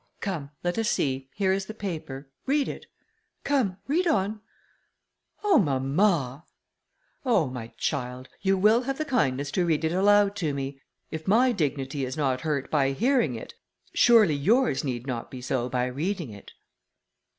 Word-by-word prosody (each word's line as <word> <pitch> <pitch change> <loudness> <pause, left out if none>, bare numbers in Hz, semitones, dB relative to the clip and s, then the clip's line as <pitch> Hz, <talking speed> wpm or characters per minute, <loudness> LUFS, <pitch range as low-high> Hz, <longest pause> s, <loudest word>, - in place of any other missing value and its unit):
Come, 165 -8 -4
let 175 +5 -1
us 225 - +1
see, 135 -1 -1
here 190 -2 +2
is 190 0 -2
the 220 - -7
paper, 155 -9 -5 0.2
read 280 +1 +2
it..., - - -7 0.6
come, 250 -10 +1
read 340 +6 +1
on." 210 - 0 1.0
"Oh! 395 -7 +5
mamma." 140 -1 +1 0.8
"Oh! 240 - +3
my 125 -3 -6
child, 125 -2 -3
you 195 0 +2
will 215 +5 +5
have 270 +1 -3
the 310 - -2
kindness 145 - 0
to 180 - +1
read 160 -1 +1
it 160 - +1
aloud 205 +2 +4
to 155 -6 -1
me; 135 0 -5 0.3
if 160 0 -6
my 245 +6 +5
dignity 140 - -2
is 130 +3 -4
not 130 -4 0
hurt 145 -3 -2
by 135 -3 +2
hearing 230 - +2
it, 110 - -8 0.4
surely 225 -9 +6
yours 190 - +2
need 125 -3 -3
not 125 -4 -4
be 130 - -8
so 125 0 -2
by 125 0 0
reading 155 - -3
it." 100 -1 -12
160 Hz, 160 wpm, -26 LUFS, 135-210 Hz, 1.0 s, surely